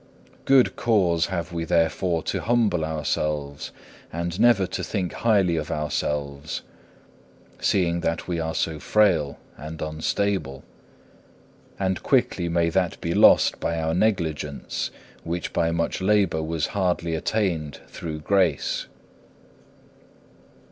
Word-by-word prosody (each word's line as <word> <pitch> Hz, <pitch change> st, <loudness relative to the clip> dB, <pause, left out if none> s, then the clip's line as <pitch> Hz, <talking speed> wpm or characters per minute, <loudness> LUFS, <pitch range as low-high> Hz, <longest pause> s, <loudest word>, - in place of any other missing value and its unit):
Good 135 Hz, -2 st, +4 dB
cause 90 Hz, -8 st, +2 dB
have 85 Hz, -2 st, -4 dB
we 85 Hz, -1 st, -2 dB
therefore 85 Hz, +1 st, +1 dB
to -, -, -2 dB
humble 110 Hz, -8 st, +2 dB
ourselves, 75 Hz, -2 st, -2 dB, 0.4 s
and 85 Hz, +2 st, -3 dB
never 115 Hz, -4 st, +5 dB
to 95 Hz, -, -4 dB
think 90 Hz, 0 st, -2 dB
highly 100 Hz, -7 st, +2 dB
of 75 Hz, -, -3 dB
ourselves, 75 Hz, -1 st, -3 dB, 1.0 s
seeing 85 Hz, -3 st, +1 dB
that 85 Hz, 0 st, -2 dB
we 85 Hz, -2 st, -1 dB
are 80 Hz, 0 st, -2 dB
so 80 Hz, -2 st, -1 dB
frail 85 Hz, -10 st, +2 dB, 0.2 s
and 80 Hz, +2 st, -8 dB
unstable. 80 Hz, -1 st, -2 dB, 1.2 s
And 95 Hz, -2 st, 0 dB
quickly 85 Hz, -1 st, +1 dB
may 85 Hz, 0 st, +2 dB
that 90 Hz, -1 st, 0 dB
be 85 Hz, -, -2 dB
lost -, -, +5 dB
by 85 Hz, 0 st, -1 dB
our 80 Hz, 0 st, 0 dB
negligence, 80 Hz, -7 st, -1 dB, 0.3 s
which 85 Hz, 0 st, -4 dB
by 85 Hz, -1 st, +2 dB
much 85 Hz, +2 st, -1 dB
labour 100 Hz, -4 st, +2 dB
was 80 Hz, -1 st, -1 dB
hardly 90 Hz, -4 st, 0 dB
attained 80 Hz, -4 st, -1 dB
through 80 Hz, -2 st, -6 dB
grace. 90 Hz, -3 st, +1 dB
85 Hz, 120 wpm, -24 LUFS, 80-95 Hz, 1.2 s, never